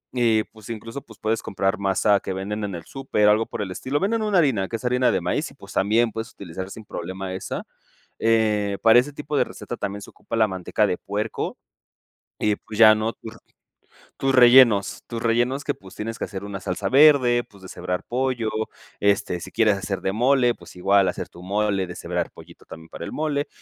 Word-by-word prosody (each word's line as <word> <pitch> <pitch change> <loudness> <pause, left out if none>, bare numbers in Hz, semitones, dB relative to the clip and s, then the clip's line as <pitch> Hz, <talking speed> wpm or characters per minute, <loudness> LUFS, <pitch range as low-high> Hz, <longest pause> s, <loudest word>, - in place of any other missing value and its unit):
y 115 -3 +3
pues 110 -2 -16
incluso, 115 +4 -6
pues 110 -5 -16
puedes 110 +1 0
comprar 95 +1 -1
masa 100 +1 +2
que 95 - -5
venden 105 +3 -4
en 100 -3 -5
el 85 - -7
súper, 130 -4 0
algo 110 +2 +3
por - - -5
el 95 - -6
estilo. 135 +9 -2
Venden 220 +5 0
una 210 -3 +1
harina, 120 - +2
que 115 - -4
es 115 - -6
harina 125 0 +3
de - - 0
maíz, - - -1
y - - -17
pues - - -13
también 110 +4 +2
puedes 110 +1 -5
utilizar 95 0 -7
sin 110 - -9
problema 95 +1 -5
esa. 95 - -5 0.6
Eh, 105 -3 +2
para 115 +1 +7
este 145 +4 -6
tipo 150 +1 -4
de - - +4
receta - - -8
también 100 +1 -4
se - - -11
ocupa - - -9
la 110 -1 +4
manteca 95 +3 0
de 90 - -1
puerco, 105 +2 -4 0.8
y 105 -1 +2
pues 110 -1 -10
ya, 110 -1 +9
¿no? 110 +1 -1
Tur 115 0 -11 0.8
tus 135 0 0
rellenos, 120 -5 +6
tus 115 -1 -5
rellenos 120 +4 +1
que, - - -1
pues, 95 -1 -15
tienes 115 +2 -5
que - - -2
hacer 100 -1 -6
una 100 -1 -6
salsa 95 +1 -3
verde, 130 -2 +5
pues 100 -2 -20
deshebrar 90 0 -4
pollo, 125 -2 -1 0.5
este, 100 -3 +1
si - - -8
quieres 110 -3 +3
hacer 95 0 -3
de 95 - -1
mole, 125 +1 +3
pues - - -15
igual 95 +1 +3
hacer - - -4
tu 85 - -14
mole, 100 0 0
deshebrar 90 - -3
pollito - - -15
también 80 0 -12
para - - -8
el - - -6
mole. 150 -1 -1
110 Hz, 210 wpm, -23 LUFS, 95-120 Hz, 0.8 s, ya